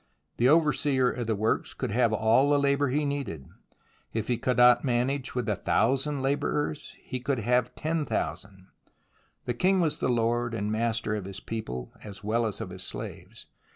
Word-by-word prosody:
The 125 +2 +4
overseer 145 -4 +3
of 120 -2 -4
the 110 - +1
works 110 +2 -1
could - - -3
have 120 +1 +2
all 110 +6 +3
the 145 - +4
labour 140 0 +2
he 145 +4 0
needed. 140 - -3 0.7
If 110 0 -3
he 120 - +2
could 125 +1 0
not 125 0 +6
manage 125 +2 -1
with 125 -1 -1
a 105 - +1
thousand 135 +5 +1
labourers, 145 +2 -1
then - - -27
he 130 - -4
could 130 +2 -1
have 125 +2 +1
ten 155 -1 -2
thousand. 95 +5 -4 0.8
The 120 - -1
king 185 +9 +2
was 160 -4 0
the - - 0
lord 120 0 0
and 105 -1 -2
master 110 -1 0
of 105 -3 -3
his 95 0 -6
people, 65 - -5
as 100 -2 -9
well 115 +2 +1
as 105 - -4
of - - -5
his - - -5
slaves. - - -7
120 Hz, 190 wpm, -28 LUFS, 110-140 Hz, 0.8 s, not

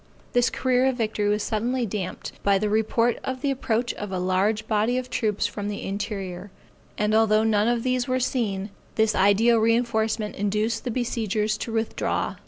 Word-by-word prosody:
This 245 -1 +3
career 255 0 +2
of 260 -2 0
victory 215 -3 0
was 210 0 +1
suddenly 240 +3 -1
damped 195 -3 -4
by 200 -1 +3
the 210 +2 -1
report 225 +2 +1
of 260 -1 -4
the 280 - +1
approach 240 -3 -1
of 205 -2 -6
a 185 - -2
large 195 +4 0
body 220 +3 +1
of 255 0 -4
troops 210 -3 0
from 205 -1 -3
the 205 -1 -4
interior, 195 -2 -4 0.5
and 210 0 +1
although 220 -1 +4
none 215 -1 +2
of 235 -1 +1
these 255 0 0
were 255 0 +1
seen, 210 -6 -1 0.2
this 220 -1 +3
ideal 210 +5 +4
reinforcement 225 -1 +1
induced 210 +4 -1
the - - -1
besiegers 220 -3 -1
to 230 - -4
withdraw. 225 0 -1
220 Hz, 180 wpm, -25 LUFS, 205-240 Hz, 0.5 s, although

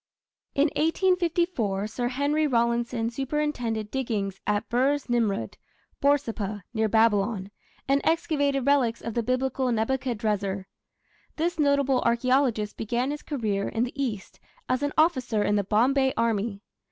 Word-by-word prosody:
In 285 +3 +3
1854 335 - +1
Sir 240 +3 -2
Henry 285 +4 +1
Rawlinson 235 -2 0
superintended 250 -5 -2
diggings 210 -7 -2
at 205 0 0
Birs 270 +4 +1
Nimrud 225 -5 0 0.4
(Borsippa, 225 -8 0
near 220 -1 +1
Babylon), 210 -2 +2 0.4
and 275 +1 +3
excavated 285 -5 +1
relics 270 -5 +2
of 230 - -5
the 235 - 0
Biblical 255 +1 0
Nebuchadrezzar. 220 -5 -1 0.7
This 335 +1 -1
notable 280 -3 +3
archaeologist 235 -2 +1
began 240 +5 -1
his 295 - -5
career 215 -9 -2
in 225 - 0
the 265 +3 -3
East 210 -7 -5 0.3
as 255 +1 0
an 285 0 0
officer 260 -9 +2
in 205 - +1
the 205 - +2
Bombay 265 +7 +2
army. 220 -2 0
240 Hz, 130 wpm, -26 LUFS, 215-280 Hz, 0.7 s, In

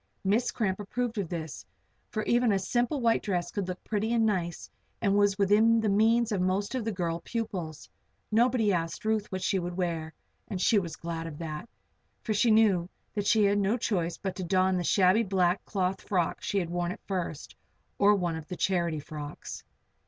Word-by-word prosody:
Miss 215 +6 +2
Cramp 195 -4 -1
approved 230 +2 -2
of 185 -5 -3
this, 160 -5 -5 0.5
for 215 - -2
even 240 +1 +3
a 200 - +3
simple 240 +7 0
white 230 -1 +3
dress 175 -4 -2
would 200 -3 -1
look 185 0 -6
pretty 220 +1 -1
and 230 -1 +3
nice 175 -5 -1 0.3
and 200 -2 +2
was 205 -1 +3
within 215 +3 +4
the 220 -1 +1
means 225 +3 +3
of 200 -3 0
most 190 +4 0
of 255 -3 -1
the 225 - -1
girl 170 -4 -2
pupils. 185 -9 -4 0.4
Nobody 225 -2 +3
asked 165 +2 -2
Ruth 215 -1 0
what 185 -1 -3
she 195 - +1
would 175 0 -4
wear; 165 -3 -2 0.4
and 195 -4 -4
she 205 +3 +4
was 170 -5 -5
glad 165 -1 -5
of 150 -3 -8
that, 160 +6 -6 0.5
for 220 - 0
she 215 +3 +3
knew 205 -6 +4 0.2
that 205 -1 -2
she 220 -1 +4
had 200 0 +3
no 205 +4 +2
choice 175 -8 -1
but 190 -2 -4
to 185 - -3
don 185 +1 +2
the 180 - 0
shabby 190 +4 +4
black 185 -3 +1
cloth 190 -1 -1
frock 180 -4 -1
she 200 - -2
had 175 -3 -1
worn 175 0 -1
at - - -10
first, 175 -6 -4 0.4
or 205 +1 +6
one 175 -4 -1
of 160 -1 -7
the 180 - -6
"charity" 170 -3 0
frocks. 150 0 -8
195 Hz, 200 wpm, -29 LUFS, 175-215 Hz, 0.5 s, or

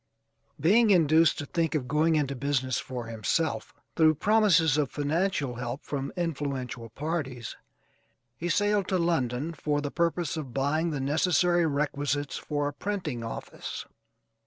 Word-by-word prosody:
Being 210 +10 +5
induced 165 -3 +5
to 145 - -4
think 165 +1 -1
of 130 -5 -1
going 155 +4 +2
into 140 -3 +1
business 130 -1 0
for 125 -2 -5
himself, 115 +8 -1 0.2
through 155 -1 +5
promises 195 -5 +4
of 150 -3 +1
financial 145 -3 -1
help 125 +2 -4
from 140 -1 -4
influential 140 -8 -3
parties, 135 -3 -4 0.8
he 170 +9 -4
sailed 205 +2 +2
to 190 - +1
London 160 -3 0
for 145 -1 -1
the 145 -1 -3
purpose 170 -1 0
of 135 -6 -6
buying 150 +5 +1
the 150 -3 -3
necessary 170 +4 +2
requisites 145 -1 -1
for 145 -1 -2
a - - -9
printing 170 - -3
office. 115 - -6
150 Hz, 140 wpm, -28 LUFS, 135-170 Hz, 0.8 s, Being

